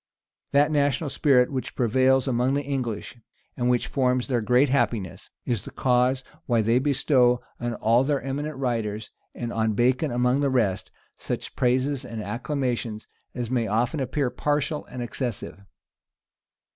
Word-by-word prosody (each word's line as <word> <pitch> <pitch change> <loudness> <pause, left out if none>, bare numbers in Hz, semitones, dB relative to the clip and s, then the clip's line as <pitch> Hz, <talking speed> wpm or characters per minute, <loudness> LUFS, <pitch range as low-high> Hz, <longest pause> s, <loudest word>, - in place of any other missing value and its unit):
That 145 +2 +4
national 145 0 +1
spirit 135 -3 +3
which 130 -2 -4
prevails 130 +3 +3
among 125 +2 +1
the 145 - 0
English, 130 -4 -4 0.4
and 125 0 0
which 125 -1 +2
forms 125 -2 0
their 125 -4 0
great 125 +5 +3
happiness, 115 -8 -1 0.2
is 120 -5 -1
the - - -9
cause 125 +1 +1 0.2
why 115 -3 +2
they 115 +3 +3
bestow 130 -3 +3 0.2
on 120 0 -2
all 115 +3 +3
their 140 0 +1
eminent 140 +2 -4
writers, 110 -5 -2 0.2
and 120 -1 -4
on 110 -1 +1
Bacon 130 +7 +2
among 125 +2 +1
the 140 -1 +2
rest, 110 -8 0 0.3
such - - -5
praises 130 +2 +1
and 115 - -7
acclamations 120 -1 -3 0.3
as 120 -1 -4
may 120 -3 +1
often 120 +9 0
appear 130 0 -1
partial 150 +1 -1
and 125 -1 -6
excessive. 120 -5 -5
125 Hz, 150 wpm, -25 LUFS, 120-135 Hz, 0.4 s, That